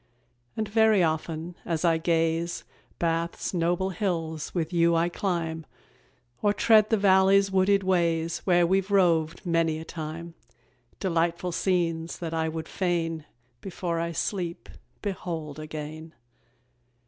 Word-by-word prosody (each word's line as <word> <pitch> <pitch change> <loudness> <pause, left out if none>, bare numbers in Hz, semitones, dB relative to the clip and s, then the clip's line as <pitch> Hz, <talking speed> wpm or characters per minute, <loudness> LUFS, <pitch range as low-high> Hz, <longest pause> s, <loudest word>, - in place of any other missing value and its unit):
And 215 -1 -1
very 220 -2 +4
often, 160 +1 -2
as 165 0 -1
I 165 -1 +3
gaze, 165 +1 0 0.3
Bath's 170 +1 -1
noble 175 +2 0
hills 165 -5 -2
with 170 0 -2
you 170 0 +3
I 165 +1 +2
climb, 170 -3 -2 0.8
Or 205 -1 +3
tread 215 0 +5
the 220 - +3
valley's 195 0 +4
wooded 190 +1 +3
ways 170 -3 +1
Where 175 -2 +3
we've 190 +2 +1
roved 170 -3 +2
many 165 -2 +1
a 160 - -8
time: 165 +1 -6 0.7
Delightful 170 0 0
scenes 170 -2 -1
that 165 -2 -5
I 160 0 0
would 160 0 -5
fain, 165 -4 -1 0.4
Before 175 -3 -3
I 170 0 -2
sleep, 175 0 -3 0.3
behold 165 -7 -4
again. 155 +1 -7
170 Hz, 125 wpm, -27 LUFS, 165-190 Hz, 0.8 s, tread